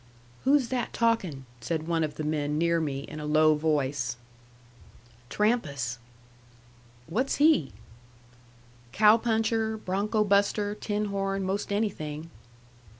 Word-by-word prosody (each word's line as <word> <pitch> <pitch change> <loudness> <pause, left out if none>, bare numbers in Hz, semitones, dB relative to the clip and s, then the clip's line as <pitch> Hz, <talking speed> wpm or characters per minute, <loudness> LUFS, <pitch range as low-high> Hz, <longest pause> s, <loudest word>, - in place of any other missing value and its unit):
"Who's 270 -3 +3
that 250 -2 -2
talkin'?" 190 - 0
said 160 +6 -3
one 165 -1 +1
of 150 -1 -3
the 155 - -4
men 150 -1 -1
near 170 +1 +2
me, 140 -3 -2
in 150 +2 -8
a 150 - -5
low 155 +1 +5
voice. 140 -5 -1 1.1
"Trampas." 140 - 0 1.1
"What's 225 - -1
he?" 290 - +3 1.2
"Cow 215 +4 +6
puncher, 225 -1 0
bronco 210 +2 0
buster, 205 0 +2
tin 210 0 -2
horn, 195 0 -1
most 195 +2 -2
anything." 165 -7 -3
185 Hz, 115 wpm, -27 LUFS, 150-215 Hz, 1.2 s, Cow